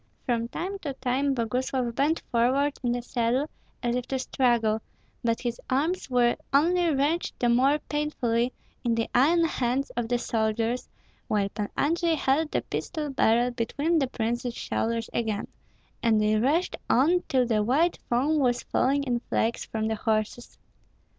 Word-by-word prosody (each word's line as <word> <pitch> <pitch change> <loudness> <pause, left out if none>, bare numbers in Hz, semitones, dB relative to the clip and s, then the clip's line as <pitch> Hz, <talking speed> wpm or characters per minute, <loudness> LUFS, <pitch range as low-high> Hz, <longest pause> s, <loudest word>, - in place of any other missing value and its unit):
From 235 -2 0
time 380 +10 -4
to 290 -7 -4
time 265 +2 0
Boguslav 250 +1 -1
bent 290 +6 +1
forward 265 +5 +2
in 245 -2 0
the 245 0 -3
saddle 245 +4 0 0.4
as 240 0 +1
if 250 -1 -3
to 270 - -1
struggle; 235 -4 +1 0.4
but 230 -1 0
his 240 -2 -3
arms 295 +6 0
were 245 -1 +3
only 340 +5 +3
wrenched 295 +5 0
the 240 - +2
more 265 +5 +4
painfully 250 -5 0 0.3
in 235 -2 +1
the 230 0 0
iron 320 +7 +4
hands 265 -3 -1
of 240 -1 -2
the 245 +1 +1
soldiers, 225 +1 -1 0.4
while 200 -2 +1
Pan 205 0 -4
Andrei 335 +2 +2
held 300 +2 +1
the - - -1
pistol 305 -4 -4
barrel 240 -1 +3
between 285 +8 0
the 270 - +1
princess 240 0 -2
shoulders 230 0 -2
again, 220 -3 -1 0.5
and 225 -2 +3
they 215 0 +2
rushed 285 +11 +1
on 330 +8 +4
till 255 -2 +3
the 220 -3 +1
white 290 +11 +2
foam 280 +6 +2
was 245 -3 +1
falling 280 +2 +1
in 245 -3 0
flakes 230 +1 0
from 220 -1 -2
the 220 - 0
horses. 215 +2 -2
250 Hz, 160 wpm, -27 LUFS, 230-285 Hz, 0.5 s, more